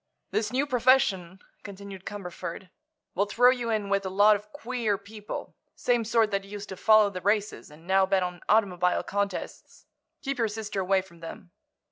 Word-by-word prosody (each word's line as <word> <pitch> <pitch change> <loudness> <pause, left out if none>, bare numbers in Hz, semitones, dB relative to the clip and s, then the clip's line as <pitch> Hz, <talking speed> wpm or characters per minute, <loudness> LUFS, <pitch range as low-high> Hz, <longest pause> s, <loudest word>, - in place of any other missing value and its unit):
"This 215 -1 -1
new 265 +3 +1
profession," 240 -9 +2 0.2
continued 200 -1 -10
Cumberford, 185 -2 -7 0.4
"will 200 +3 +1
throw 245 +5 +5
you 245 -2 -2
in 215 -2 0
with 200 0 +1
a 190 - -3
lot 205 +3 +5
of 210 +1 -8
'queer' 230 -4 -2
people—same 215 +3 -4
sort 225 -1 +2
that 195 0 -1
used 205 +1 -8
to 190 - -5
follow 215 +1 +5
the 185 -2 -6
races 205 -1 -1
and 150 +3 -16
now 190 +1 +3
bet 190 -1 +2
on 180 -1 -5
automobile 185 -5 +2
contests. 200 -2 -4 0.4
Keep 275 -2 -3
your 230 - +2
sister 210 -2 -4
away 190 0 +2
from 170 -3 -18
them." 165 +2 -10
200 Hz, 170 wpm, -27 LUFS, 190-220 Hz, 0.4 s, throw